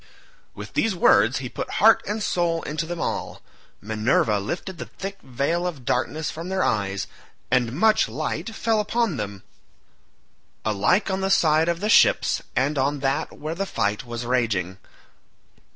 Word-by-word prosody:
With - - -9
these 225 -4 +1
words 240 +7 +4
he - - -4
put - - -6
heart - - +6
and 210 0 -2
soul 170 -3 0
into 155 +2 -3
them 175 0 -5
all. - - -4 0.4
Minerva 110 0 +1
lifted 170 - -5
the - - -6
thick 195 0 -7
veil 140 +8 -1
of 145 -8 -6
darkness 155 +5 -1
from 165 +3 -7
their 190 0 0
eyes, 100 -3 0 0.5
and 120 -2 +2
much 215 - +3
light 155 - -4
fell 225 -1 +1
upon 215 - 0
them, 100 -2 -5 1.2
alike 110 - +2
on 190 0 -1
the 190 - 0
side 160 -3 +3
of 170 +1 -1
the 210 - 0
ships - - +4
and 140 +3 +1
on 140 +1 0
that 135 0 -1
where 155 +2 -4
the 195 +3 -3
fight 105 - -1
was 120 0 -6
raging. 105 -7 0
155 Hz, 160 wpm, -24 LUFS, 115-185 Hz, 1.2 s, heart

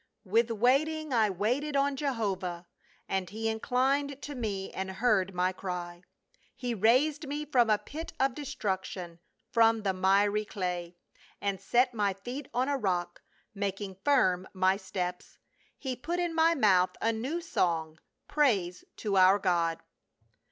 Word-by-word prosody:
" - - -52
With 230 +1 +4
waiting 275 +7 +1
I 220 -3 +4
waited 245 +10 -1
on 280 0 +2
Jehovah, 200 -10 -2 0.4
And 190 -2 -2
he 220 +3 -3
inclined 265 +5 0
to 295 - -5
me 210 -7 -3
and 190 0 -4
heard 195 -3 +1
my 180 +1 +2
cry; 175 -2 -5 0.5
He 245 -2 -3
raised 270 - +2
me 295 +2 -3
from 250 -6 +3
a 215 - +5
pit 300 +10 -7
of 270 -1 +2
destruction, 190 - -4 0.3
from 225 -1 +4
the 195 -2 +1
miry 200 +3 +3
clay. 180 -4 -4 0.4
And 200 -2 -2
set 250 +4 +2
my 205 -3 +1
feet 245 +8 -7
on 255 +2 0
a 285 -1 +1
rock, 175 -5 -1 0.3
making 200 -1 -3
firm 190 -10 +3
my 185 +1 +3
steps, 180 -2 -5 0.4
He 260 -3 -4
put 335 +8 -3
in 345 -1 -1
my 330 +1 +4
mouth 190 - +3
a 225 0 +1
new 260 +10 -2
song, 165 - -1 0.3
praise 200 -12 +1
to 200 -3 -1
our 190 +1 +7
God." 170 -4 0
215 Hz, 150 wpm, -30 LUFS, 185-265 Hz, 0.5 s, our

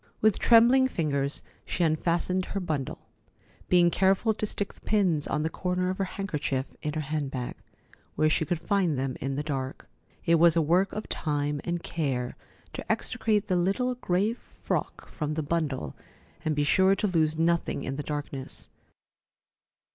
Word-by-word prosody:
With 215 -2 +3
trembling 245 +3 +6
fingers, 140 - -1 0.2
she 180 - -1
unfastened 170 +3 +1
her 200 - -3
bundle, 155 -7 -4 0.6
being 175 -1 +5
careful 195 +5 +3
to 215 0 -3
stick 205 -1 -4
the - - -20
pins 180 -8 +1
on 150 - 0
the 160 - 0
corner 180 +1 -1
of 190 - -6
her 195 - +1
handkerchief 150 -9 -2 0.2
in 150 - -2
her 155 - -1
hand 150 -1 -2
bag, 125 -2 -4 0.6
where 155 - +3
she 155 - +2
could 160 +2 -1
find 185 -5 +1
them 130 -1 -2
in 135 0 -2
the 145 - -2
dark. 135 -3 -4 0.4
It 165 -1 +4
was 170 0 +6
a - - +4
work 180 +6 +3
of 215 - -5
time 145 -2 -1
and 175 -1 -2
care 130 -7 -2 0.4
to - - -3
extricate 210 -2 0
the 185 - +1
little 200 +9 +1
gray 210 -2 0
frock 245 - -4
from 150 -2 -3
the 155 - -1
bundle 145 - -2 0.5
and 155 -2 0
be 145 - +2
sure 190 +6 +4
to 205 - -1
lose 160 -5 +1
nothing 170 +1 +1
in 135 - -3
the - - -2
darkness. 145 -2 -5
165 Hz, 170 wpm, -28 LUFS, 145-190 Hz, 0.6 s, trembling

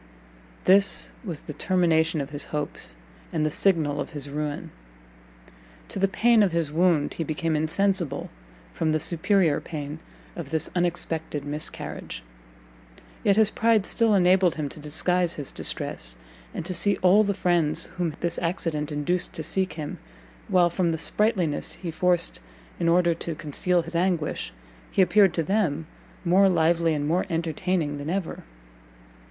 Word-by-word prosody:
This 195 +1 +4
was 170 -9 -5
the 150 - -8
termination 165 -3 +1
of 140 +1 -6
his 145 0 -3
hopes, 150 - -5 0.4
and 155 -2 0
the 155 - 0
signal 155 -6 +1
of - - -6
his 145 -1 -6
ruin! 150 +2 -4 1.2
To - - -5
the 195 - +3
pain 230 +3 +3
of 200 -3 +3
his 165 -3 0
wound 165 -2 +2
he 165 - -3
became 160 +1 -1
insensible, 165 0 0 0.4
from 160 -1 0
the 155 - +1
superior 170 -1 +1
pain 150 -1 -6 0.4
of 165 -5 -6
this 160 +1 0
unexpected 165 -4 -2
miscarriage; 150 - -4 1.0
yet 200 - +4
his 215 0 +4
pride 225 -3 +2
still 225 -3 +2
enabled 185 -1 +4
him 150 -3 -3
to 150 - -10
disguise 170 +3 0
his 145 -3 -5
distress, - - -4 0.4
and - - -5
to 185 - -2
see 180 +4 +3
all 195 +4 +6
the 200 -1 -1
friends 175 -5 +1
whom 170 -4 -1
this 170 0 0
accident 165 -3 -2
induced 150 +5 -1
to - - -4
seek 190 -1 -1
him, 155 +2 -6 0.5
while 180 -4 +3
from 175 0 0
the 160 - -1
sprightliness 185 -4 0
he 175 -3 -6
forced 175 +1 +1 0.4
in 170 -1 +2
order 175 0 +4
to 165 0 -5
conceal 170 +4 0
his 165 +1 -8
anguish, 170 - -1 0.4
he 190 - +3
appeared 195 -2 +4
to 165 - +1
them 165 -4 0 0.4
more 190 +3 +5
lively 165 -1 +2
and 145 0 -2
more 175 +5 +1
entertaining 165 -2 -1
than 145 +2 -5
ever. 185 -1 -3
170 Hz, 155 wpm, -25 LUFS, 155-185 Hz, 1.2 s, all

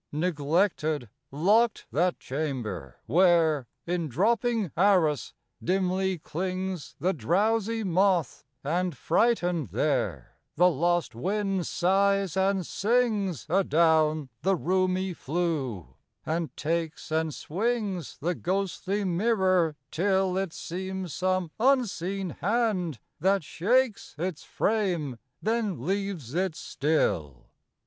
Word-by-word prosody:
Neglected, 155 - 0 0.2
locked 210 - +2
that 175 +3 +1
chamber, 125 - -4
where 160 -3 +3 0.2
In 170 -2 -1
dropping 220 - +1
arras 170 -6 +2 0.3
dimly 190 +1 +1
clings 185 +1 -4
The 185 +2 +1
drowsy 220 +7 +1
moth; 185 - +1 0.2
and, 170 +1 -1
frightened 175 - +1
there, 125 - -1 0.2
The 180 +3 +5
lost 175 +3 +1
wind 195 - -1
sighs 195 0 +2
and 190 -1 +1
sings 210 - 0
Adown 160 -4 +3
the 195 +1 +2
roomy 185 +1 0
flue, 145 - -2 0.3
and 165 0 -2
takes 165 0 -2
And 160 0 +1
swings 200 - -2
the 175 +4 -1
ghostly 195 +2 -2
mirror 185 -4 +2 0.2
till 190 +1 +1
It 190 -2 -1
seems 185 0 -5
some 185 -1 0
unseen 200 -8 +1
hand 195 - 0 0.2
that 195 -1 +2
shakes 230 - 0
Its 170 -1 -3
frame 175 - -1 0.2
then 215 - -1
leaves 190 - -2
it 180 -1 0
still. 80 - -1
180 Hz, 100 wpm, -27 LUFS, 155-195 Hz, 0.3 s, The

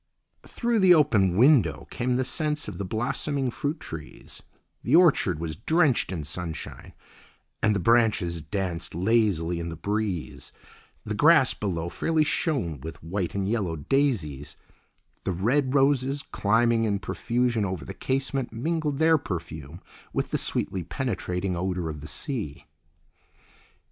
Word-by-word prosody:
Through 235 -2 0
the 185 -2 +7
open 105 - +3
window 120 - +4
came 125 +1 -1
the 130 - +1
scents 150 +2 -2
of 100 -4 -7
the - - -2
blossoming 130 +5 -1
fruit 150 +5 -3
trees; 75 - -9 0.4
the - - +2
orchard 155 - +4
was 80 -1 -4
drenched 145 - +2
in 85 -5 -3
sunshine 80 +2 -7 0.7
and 105 -1 +3
the - - +1
branches 105 -6 +2
danced 85 +1 -4
lazily 90 -4 +1
in 85 0 -4
the 80 - -6
breeze; 100 0 -3 0.5
the 105 - -4
grass 145 +3 +5
below 85 -5 -3
fairly 160 - +1
shone 130 - -1
with 80 +2 -8
white 90 +2 -3
and 100 -1 -1
yellow 100 -7 -1
daisies, 75 - -1
and - - -37
the - - 0
red 130 +6 +1
roses 140 0 +2
climbing 115 +2 +2
in 100 -2 +1
profusion 120 +2 -1
over 90 -7 -3
the - - -7
casement 135 -1 -2
mingled 150 +4 -1
their 160 +1 +4
perfume 85 - -6 0.3
with - - -2
the - - +1
sweetly 95 - -1
penetrating 90 - -2
odour 90 -1 -2
of 75 -2 -6
the 75 - -8
sea. 105 - -4
105 Hz, 145 wpm, -26 LUFS, 85-135 Hz, 0.7 s, the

